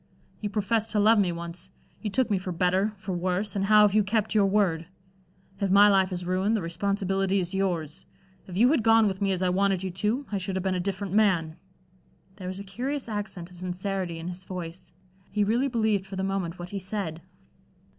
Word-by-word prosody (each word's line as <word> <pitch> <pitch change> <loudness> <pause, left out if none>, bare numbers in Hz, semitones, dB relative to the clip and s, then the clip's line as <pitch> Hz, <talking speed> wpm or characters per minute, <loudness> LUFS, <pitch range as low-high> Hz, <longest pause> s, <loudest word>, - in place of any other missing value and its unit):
You 210 - -3
professed 215 +2 0
to 210 - +2
love 215 +1 +5
me 190 -3 +2
once. 170 +2 -7 0.3
You 215 - -2
took 235 +3 +1
me 195 - +2
for 185 0 -5
better, 185 +4 +1
for 195 0 -6
worse, 185 +4 -1
and 195 -1 0
how 210 +1 +6
have 205 -2 +4
you 215 0 +4
kept 215 +2 0
your 205 -2 +4
word? 185 -5 +1 0.7
If 200 - 0
my 200 +2 +7
life 190 -1 +3
is 180 -1 -4
ruined, 190 +5 +1
the - - -2
responsibility 195 +2 0
is 180 0 -2
yours. 180 -3 -2 0.4
If 180 -1 -6
you 235 +4 +6
had 305 -3 +3
gone 225 0 +5
with 195 -1 -1
me 195 -1 +2
as 185 -1 0
I 180 - +3
wanted 195 0 +1
you 190 - -3
to, 215 +9 -1
I 200 - -1
should 190 0 -4
have 190 - -2
been 190 -1 0
a 180 - -1
different 195 +1 -3
man." 185 -7 +2 0.8
There 185 -2 -7
was 185 +1 -4
a - - -6
curious 255 +8 -4
accent 195 -5 -5
of 175 - -14
sincerity 185 -1 -3
in 165 +1 -6
his 180 +1 -6
voice. 180 -1 -7 0.4
He 210 0 +1
really 235 +6 +2
believed 220 -6 0
for 195 - -7
the 190 - -2
moment 190 -3 -2
what 175 0 -7
he 200 - -4
said. 185 -4 -4
195 Hz, 220 wpm, -27 LUFS, 180-210 Hz, 0.8 s, my